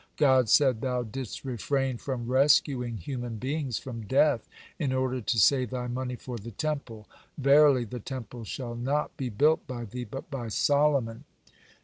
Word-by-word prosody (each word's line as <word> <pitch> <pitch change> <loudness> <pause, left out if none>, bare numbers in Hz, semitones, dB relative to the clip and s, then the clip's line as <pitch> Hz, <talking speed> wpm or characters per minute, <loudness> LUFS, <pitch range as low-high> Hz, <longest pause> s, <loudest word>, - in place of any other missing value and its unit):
God 130 -5 +4
said: 130 -4 +4
"Thou 125 -2 -1
didst 120 +3 -7
refrain 135 +1 -1
from 125 -2 -4
rescuing 130 -2 +3
human 120 +4 -5
beings 135 0 -2
from 115 -5 -7
death, 135 -1 +2 0.3
in 145 -5 0
order 130 -1 0
to 115 +2 -1
save 130 +2 +4
thy 125 0 -3
money 125 +1 -3
for 120 -1 -7
the 110 +4 -8
Temple. 115 -3 -4 0.3
Verily, 140 -2 +5
the 120 +3 -6
Temple 120 0 -7
shall 120 +2 -5
not 135 +5 -1
be 130 -2 -3
built 150 +9 +2
by 120 -2 -5
thee, 125 +4 -6
but 135 +7 -8
by 125 -4 -4
Solomon." 140 0 +1
130 Hz, 160 wpm, -28 LUFS, 120-140 Hz, 0.3 s, Verily